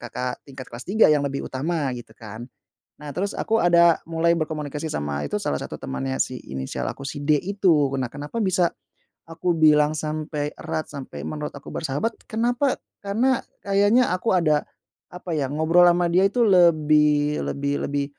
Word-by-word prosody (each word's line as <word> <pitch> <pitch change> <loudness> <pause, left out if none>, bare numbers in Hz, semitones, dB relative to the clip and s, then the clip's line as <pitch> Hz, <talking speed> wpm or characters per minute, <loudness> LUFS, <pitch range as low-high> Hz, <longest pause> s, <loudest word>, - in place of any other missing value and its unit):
kakak 125 0 -5
tingkat 130 -1 -9
kelas 120 +2 -8
3 205 -5 +5
yang 150 - +3
lebih 140 0 -3
utama, 145 0 -2
gitu, 120 -1 -10
kan. 115 +2 -9 0.5
Nah, 145 -2 -8
terus, 200 +3 -1
aku 225 0 0
ada 170 -1 +5
mulai 165 +1 +1
berkomunikasi 155 -1 -4
sama 75 0 -3
itu 70 - -2
salah - - -1
satu - - -7
temannya 65 0 -4
si - - 0 0.2
inisial 65 -1 -4
aku 140 - -8
si 145 0 -6
D 150 0 +3
itu. 195 +1 +1 0.2
Nah, 130 -3 -3
kenapa 145 +11 -4
bisa 185 -3 +2 0.5
aku 165 +2 -2
bilang 150 -2 +5
sampai 155 -1 -3
erat, 155 - -3
sampai 140 -2 -8
menurut 150 -1 -4
aku 140 - -10
bersahabat, 160 +9 -1 0.2
kenapa? 245 +4 +1 0.3
Karena 235 +6 +1 0.2
kayaknya 205 +5 +3
aku 185 +5 -1
ada 155 -4 +2 0.5
apa, 180 0 -7
ya, 145 - 0
ngobrol 160 +4 +4
ama 175 0 +3
dia 180 +2 +4
itu 240 +5 -1
lebih 150 -6 +4
lebih 140 0 -2
lebih 140 0 -1
155 Hz, 170 wpm, -23 LUFS, 140-180 Hz, 0.5 s, 3